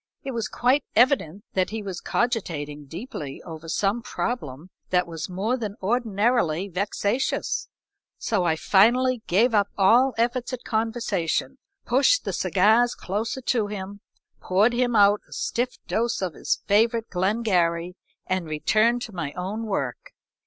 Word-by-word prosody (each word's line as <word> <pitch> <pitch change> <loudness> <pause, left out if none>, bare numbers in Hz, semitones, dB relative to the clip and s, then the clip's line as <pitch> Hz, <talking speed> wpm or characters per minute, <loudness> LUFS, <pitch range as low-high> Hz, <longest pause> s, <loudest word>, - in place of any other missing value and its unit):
It 275 - -4
was 230 -3 -2
quite 260 +4 +2
evident 215 - +3
that 185 -1 +1
he 220 0 -5
was 190 -3 -6
cogitating 155 - -2
deeply 160 - -7
over 165 -1 -9
some 200 +6 0
problem 175 - -4 0.2
that 180 -1 +2
was 165 0 -6
more 205 +8 -1
than 215 -4 -5
ordinarily 210 -4 +1
vexatious, 200 +6 -1 0.5
so 205 -6 0
I 165 -2 +2
finally 240 +8 +3
gave 225 +7 +3
up 205 -2 +3
all 235 +6 +4
efforts 240 +2 0
at 250 - -5
conversation, 225 +1 -1 0.3
pushed 275 - +3
the - - -2
cigars 220 +6 +3
closer 220 +7 -3
to 235 -4 0
him, 200 0 -7 0.4
poured 205 +6 +2
him 245 -1 +1
out 205 0 +5
a - - -11
stiff 255 - -2
dose 235 +1 0
of 180 -3 -2
his - - -2
favorite 225 +2 +2
Glengarry, 180 -3 +1 0.3
and 185 -3 -2
returned 215 +10 +2
to 220 - -8
my 160 -6 -4
own 205 +5 -4
work. 485 - -3
210 Hz, 145 wpm, -25 LUFS, 180-240 Hz, 0.5 s, out